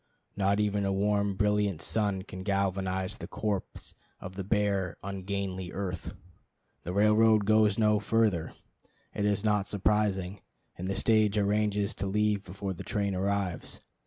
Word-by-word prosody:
Not 100 +1 +2
even 105 -1 +1
a 100 - 0
warm, 100 0 +1
brilliant 105 -3 +1
sun 100 -1 0
can 95 -2 -8
galvanize 95 -1 -1
the - - -6
corpse 105 -3 -4 0.3
of 95 +1 -8
the 95 - -4
bare 100 -3 0
ungainly 95 -1 -4
earth. 90 -3 -4 0.7
The 90 - -5
railroad 105 +2 +4
goes 110 -1 +4
no 105 -1 +3
further, 105 -5 +1 0.6
it 105 - -1
is 100 -1 +1
not 105 -2 +1
surprising, 100 -2 0 0.3
and 90 - -5
the 95 - -1
stage 110 -2 +3
arranges 105 0 +1
to 100 - -3
leave 105 0 +1
before 95 +1 -5
the 85 - -9
train 100 -2 -1
arrives. 95 -2 -2
100 Hz, 145 wpm, -29 LUFS, 95-105 Hz, 0.7 s, railroad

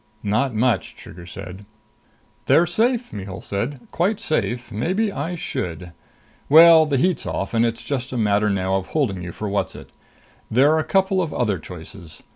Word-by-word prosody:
"Not 110 +4 0
much," 115 -2 0
Trigger 85 0 -12
said. 90 +2 -9 0.8
"They're 170 - +5
safe," 235 +7 0
Mihul 100 -2 -6
said. 120 +7 -3
"Quite 195 +5 0
safe. 120 -6 -2
Maybe 185 - 0
I 165 +2 -4
should.... 90 - -5 0.6
Well, 160 +1 +8
the 140 -2 +1
heat's 175 +2 0
off, 95 - -3
and 115 0 +3
it's 115 -1 -1
just 135 -2 -3
a 130 - -3
matter 105 -1 +2
now 95 -1 0
of 95 - -5
holding 115 - -1
you 85 -1 -6
for 105 - -5
Whatzzit. 100 0 -3 0.6
There're 145 +7 +4
a - - 0
couple 190 0 +1
of 165 -4 -3
other 105 -7 0
choices. 85 0 -11
120 Hz, 165 wpm, -22 LUFS, 100-160 Hz, 0.8 s, Well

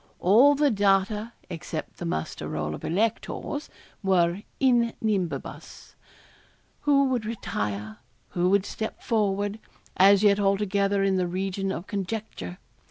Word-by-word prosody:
All 245 +10 +6
the 290 -1 +3
data, 205 +2 +1
except 165 -2 -6
the 175 - -4
muster 80 - -3
roll 75 0 -3
of - - -8
electors, 225 - -2 0.3
were 185 -1 +2 0.2
in 240 -3 +3
nubibus 200 -6 -3 0.9
who 280 -1 +3
would 250 -3 0
retire 105 - -4 0.3
who 180 0 +1
would 200 0 +3
step 220 +1 -5
forward, 205 -1 0 0.4
as 200 +2 +6
yet 205 -1 +5
altogether 200 0 +1
in 195 -1 +2
the 180 -1 +1
region 195 +2 -2
of 175 -1 -5
conjecture. 195 - -5
200 Hz, 125 wpm, -26 LUFS, 180-220 Hz, 0.9 s, All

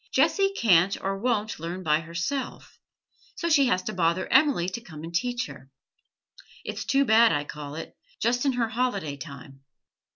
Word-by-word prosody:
'Jessie 390 -1 +3
can't 190 -3 +4
or 195 0 -3
won't 215 -4 -1
learn 175 +3 -5
by 155 -2 +3
herself, 170 +12 -5 0.6
so 340 - -3
she 290 -5 +4
has 185 -6 +1
to 215 - -4
bother 170 0 +1
Emily 265 - +4
to 210 +6 -4
come 155 -9 -11
and 165 +1 -8
teach 245 +7 -1
her. 135 -9 -12 1.0
It's - - -5
too 275 0 +2
bad, 230 0 +6
I 145 -2 0
call 145 0 -8
it, 165 - -8 0.2
just 240 +3 +1
in 275 -2 +2
her 235 -2 0
holiday 220 - -1
time. 135 0 -11
195 Hz, 170 wpm, -26 LUFS, 165-245 Hz, 1.0 s, bad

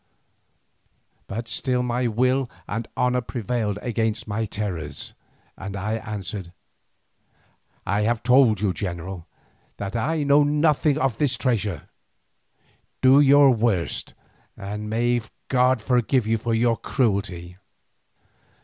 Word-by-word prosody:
But 115 +4 -5
still 125 +3 -1
my 125 0 0
will 125 +3 +1 0.2
and 115 +2 -4
my - - 0
honour 125 0 +2
prevailed 115 -3 -2
against 110 -2 -1
my 110 +2 -1
terrors, 95 -8 -5 0.4
and 95 +1 -7
I 105 +3 -2
answered: 100 -4 -6 1.3
"I 100 +2 0
have 115 +1 0
told 125 -5 +4
you, 100 -3 +1
general, 90 -2 -5 0.5
that 100 +2 -5
I 150 +7 0
know 145 +1 +5
nothing 150 0 +2
of 135 -6 0
this 130 -4 +1
treasure. 105 -8 -1 1.2
Do 130 +2 +7
your 140 -1 +7
worst, 110 -7 -1 0.4
and 105 +2 -5
may 120 +2 +1 0.3
God 130 -1 +3
forgive 125 0 +2
you 110 0 +1
for 115 +1 -1
your 115 0 +2
cruelty." 95 -8 -2
115 Hz, 120 wpm, -24 LUFS, 105-125 Hz, 1.3 s, Do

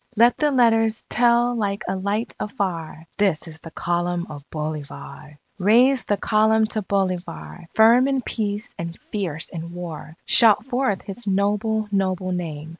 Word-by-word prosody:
Let 235 +2 +5
the 300 - +3
letters 225 -4 +2
tell 240 +1 +3
like 205 -3 -2
a - - -1
light 200 +4 -2
afar, 175 - -4
"This 190 -5 +1
is 160 -1 -9
the 165 - -10
Column 175 +1 -2
of 145 -1 -9
Bolivar!"_ 150 -1 -7 0.3
_Raise 245 +5 +4
the 205 - +1
Column 220 +1 +3
to 215 - -1
Bolivar! 185 -3 -3
Firm 235 +4 +6
in 270 -2 0
peace, 210 +2 -3
and 170 0 -5
fierce 170 -7 -3
in 170 0 -7
war! 165 -2 -8
Shout 220 -1 +5
forth 255 -6 -1
his 210 +3 -9
noble, 210 +2 0
noble 185 -2 -1
name! 160 -4 -4
200 Hz, 150 wpm, -22 LUFS, 170-225 Hz, 0.3 s, Firm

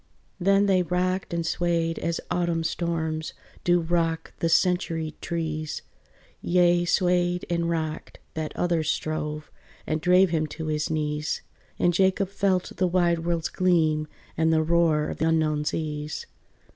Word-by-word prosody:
Then 195 +2 +4
they 190 -2 +3
rocked 180 +2 -1
and 170 -1 -1
swayed 170 -1 0
as 170 0 -1
Autumn 170 -2 0
storms 160 -2 -2 0.3
Do 175 0 +4
rock 165 -1 -1
the 165 - +1
centuried 165 -3 +1
trees: 155 -2 -3 0.6
Yea, 175 0 +3
swayed 180 0 +1
and 170 0 0
rocked: 160 -2 -3 0.2
that 155 -1 -3
other 175 -2 +1
strove, 155 0 -3 0.3
And 155 0 -1
drave 180 +1 +5
him 155 -2 +1
to 160 +1 -6
his 150 -1 -1
knees, 150 -1 -2 0.3
And 175 - +2
Jacob 190 +2 +2
felt 195 -2 0
the 185 - +2
wide 175 -1 +2
world's 170 0 -1
gleam 160 -4 +2 0.3
And 160 +1 +2
the 160 0 +3
roar 160 -2 +2
of - - -6
unknown 155 -2 +1
seas. 150 -1 -3
170 Hz, 140 wpm, -26 LUFS, 155-175 Hz, 0.6 s, drave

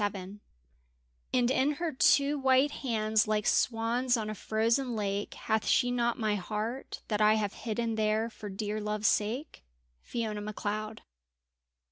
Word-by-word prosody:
XXVII 200 0 -3 0.9
And 245 -1 +2
in 270 +2 +2
her 330 +2 -2
two 280 +1 +3
white 265 +2 +4
hands 220 -5 0
like 215 -1 0
swans 240 +2 +2
on 215 -1 -3
a - - -3
frozen 230 +4 0
lake, 200 -1 -2
Hath 220 -1 -1
she 245 -1 +3
not 240 -1 0
my 215 -2 0
heart, 215 +6 -4
that 210 -1 -1
I 215 0 +6
have 205 -2 -1
hidden 230 0 -2
there 215 +1 +1
for 215 -2 -9
dear 210 +2 -3
love's 210 0 0
sake. 240 +9 -1 0.4
FIONA 220 -3 -3
MACLEOD. 215 +1 -4
220 Hz, 145 wpm, -30 LUFS, 210-245 Hz, 0.9 s, I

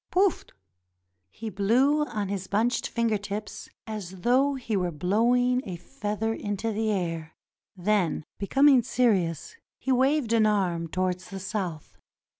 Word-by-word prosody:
PoufT' 380 0 +1 0.8
He 220 - -7
blew 255 +10 +3
on 210 -7 -3
his 190 -1 -4
bunched 225 +4 +1
finger 230 -3 0
tips 205 +1 -6 0.2
as 190 -4 -7
though 265 +5 +3
he 235 -4 -3
were 180 -2 0
blowing 240 - +2
a 185 - -5
feather 215 +2 -3
into 205 +1 -3
the 220 +1 -1
air. 165 -5 -2 0.4
Then 180 -5 0
becoming 270 +5 +5
serious, 210 - 0 0.2
he 265 - -2
waved 260 -1 +2
an 220 -2 +4
arm 180 -5 0
towards 185 +2 -2
the 195 - -6
South. 185 -6 -5
210 Hz, 135 wpm, -27 LUFS, 185-245 Hz, 0.8 s, becoming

